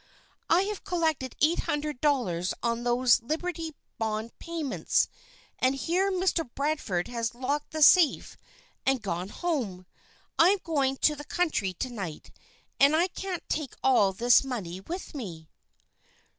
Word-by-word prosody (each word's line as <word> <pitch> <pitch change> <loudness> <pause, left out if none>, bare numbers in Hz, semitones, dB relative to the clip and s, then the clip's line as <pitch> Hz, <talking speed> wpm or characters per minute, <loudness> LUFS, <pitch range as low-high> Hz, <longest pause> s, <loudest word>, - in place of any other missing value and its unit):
"I 340 +3 +5
have 415 0 -4
collected 315 -7 -1
eight 320 +3 +3
hundred 295 -3 -2
dollars 200 - +1
on 235 0 0
those 245 0 +3
Liberty 325 +4 -3 0.2
Bond 220 +1 -2
payments, 325 -6 0 0.5
and 260 +1 +2
here 360 +7 0
Mr. 360 -6 0
Bradford 280 - -1
has 235 -1 -3
locked 280 +4 -2
the 310 -1 +1
safe 330 -1 +5 0.5
and 265 -3 +1
gone 180 -1 -3
home. 225 - -3 0.5
I'm 370 +5 +6
going 275 -5 0
to 300 - +4
the 295 - -8
country 295 - 0
to 250 +8 -4
night 190 -9 -7 0.5
and 280 +3 +6
I 345 +4 +2
can't 375 -1 -5
take 300 -5 -3
all 240 -7 +4
this 240 +7 +4
money 205 -10 -5
with 345 - -7
me." 175 - -7
270 Hz, 140 wpm, -28 LUFS, 230-325 Hz, 0.5 s, I'm